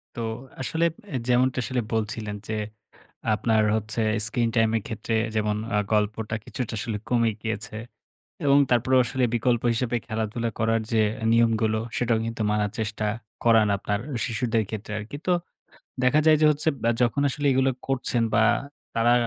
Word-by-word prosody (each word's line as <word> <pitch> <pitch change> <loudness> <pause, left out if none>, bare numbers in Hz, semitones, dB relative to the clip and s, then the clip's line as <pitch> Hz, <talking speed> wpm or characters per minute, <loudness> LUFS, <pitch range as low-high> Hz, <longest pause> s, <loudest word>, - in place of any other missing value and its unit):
তো 120 - -4 0.4
আসলে 160 +6 0 0.3
অ্যা 130 - -1
যেমনটা 125 +1 +3
আসলে 130 -1 -1
বলছিলেন 110 -1 -2
যে 110 - -3 0.8
আপনার 110 +1 +2
হচ্ছে 110 +1 -2 0.2
স্ক্রিন-টাইমের 115 0 +1
ক্ষেত্রে 115 0 -3 0.2
যেমন 105 -1 +1 0.2
আ - - +4
গল্পটা 105 +1 0
কিছুটা 125 -3 -4
আসলে 110 -1 -3
কমে 115 -2 +3
গিয়েছে। 110 -1 -4 0.7
এবং 140 0 +5
তারপরেও 130 +2 +4
আসলে 125 +2 0
বিকল্প 120 0 +1
হিসাবে 120 0 0
খেলাধুলা 110 +1 -2
করার 115 0 +2
যে 110 - +3 0.2
অ্যা 110 - -3
নিয়মগুলো, 110 -1 +3 0.2
সেটাও 120 -2 +1
কিন্তু 115 -1 -3
মানার 105 -1 +1
চেষ্টা 110 0 -2 0.4
করান 115 -2 +5
আপনার 100 +1 -2 0.3
শিশুদের 115 -1 0
ক্ষেত্রে 110 0 -6
আরকি। 105 +7 -7
তো 180 - +3 0.7
দেখা 135 +4 +4
যায় 155 -1 +7
যে 155 - +6
হচ্ছে 150 +2 +1
বা 115 - +2
যখন 120 +3 +2
আসলে 145 +2 -2
এগুলো 130 +1 +3 0.2
করছেন 125 -3 0
বা - - +5 0.5
তারা 115 +1 +3
115 Hz, 155 wpm, -25 LUFS, 110-125 Hz, 0.8 s, যায়